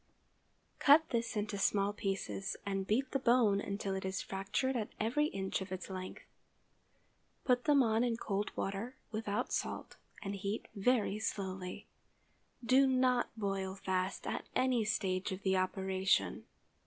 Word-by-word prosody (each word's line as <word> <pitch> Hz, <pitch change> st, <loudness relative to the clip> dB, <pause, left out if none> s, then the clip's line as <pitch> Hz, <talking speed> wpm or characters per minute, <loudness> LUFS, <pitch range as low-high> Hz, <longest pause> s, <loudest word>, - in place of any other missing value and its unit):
Cut 300 Hz, +3 st, +7 dB
this 230 Hz, -1 st, -1 dB
into 205 Hz, -1 st, -2 dB
small 200 Hz, +1 st, +2 dB
pieces, 195 Hz, -1 st, -3 dB
and 195 Hz, -1 st, -2 dB
beat 255 Hz, +5 st, +1 dB
the 275 Hz, -, +1 dB
bone 235 Hz, -5 st, +4 dB
until 200 Hz, -1 st, -3 dB
it 190 Hz, -, -3 dB
is 190 Hz, 0 st, -2 dB
fractured 200 Hz, +8 st, -1 dB
at 220 Hz, -3 st, -1 dB
every 250 Hz, +8 st, +2 dB
inch 190 Hz, -6 st, -2 dB
of 190 Hz, 0 st, -6 dB
its 190 Hz, +1 st, -5 dB
length. 185 Hz, 0 st, -6 dB, 1.2 s
Put 250 Hz, -1 st, +2 dB
them 290 Hz, -3 st, +5 dB
on 225 Hz, 0 st, +2 dB
in 235 Hz, -2 st, +1 dB
cold 205 Hz, -2 st, -1 dB
water, 200 Hz, +6 st, -3 dB, 0.2 s
without 215 Hz, -2 st, -2 dB
salt, -, -, -3 dB, 0.3 s
and 200 Hz, -1 st, -3 dB
heat 200 Hz, +2 st, -3 dB
very 210 Hz, -1 st, +2 dB
slowly. 190 Hz, -4 st, -4 dB, 0.8 s
_Do 265 Hz, +3 st, +5 dB
not 255 Hz, -1 st, +3 dB
boil 195 Hz, -2 st, -2 dB
fast 190 Hz, -1 st, -2 dB
at -, -, -3 dB
any 255 Hz, -3 st, +3 dB
stage 190 Hz, -2 st, 0 dB
of 190 Hz, +1 st, -5 dB
the 190 Hz, -1 st, +2 dB
operation. 185 Hz, -, +1 dB
200 Hz, 145 wpm, -34 LUFS, 190-240 Hz, 1.2 s, Cut